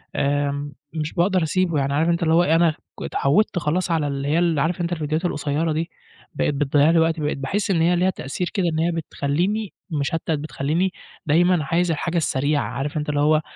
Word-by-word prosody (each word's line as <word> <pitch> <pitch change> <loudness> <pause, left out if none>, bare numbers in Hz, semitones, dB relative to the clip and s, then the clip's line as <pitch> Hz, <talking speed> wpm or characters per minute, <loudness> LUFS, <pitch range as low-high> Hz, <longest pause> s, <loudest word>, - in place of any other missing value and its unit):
آمم 145 0 -1 0.2
مش 155 -1 -3
باقدر 185 0 +2
أسيبه 170 -1 +1
يعني 140 0 0
عارف 160 +4 +2
أنت 170 0 +1
اللي 160 -1 +2
هو 170 +2 +5
إيه 165 -2 +3
أنا 165 -1 +4 0.3
ك - - -5
اتعوّدت 175 +7 +1
خلاص 175 +3 -1
على 160 -3 +1
اللي 140 0 -3
هي 155 +3 +2
ال 170 -4 +2
عارف 170 +5 0
أنت 170 - -2
الفيديوهات 155 +1 -2
القصيرة 155 0 -1
دي؟ 160 +2 -2 0.5
بقت - - 0
بتضيّع 145 +1 +3
لي 165 - +4
وقتي 160 0 +1
بقيت 150 0 -1
باحس 195 +9 -1
إن 165 -3 +2
هي 175 +2 +3
ليها 180 +2 +2
تأثير 180 0 -4
كده 195 -4 0
إن 160 - -1
هي 170 +2 +1
بتخليني 170 +6 -2 0.2
مشتت 160 +2 -2
بتخليني 155 +4 -1 0.3
دايمًا 170 +2 +3
عايز 170 +3 +1
الحاجة 170 +2 -2
السريعة، 145 -2 +1
عارف 145 +3 -4
أنت 150 0 -3
اللي 145 -1 0
هو 150 +2 +4
ما 155 - +2
160 Hz, 210 wpm, -22 LUFS, 145-175 Hz, 0.5 s, هو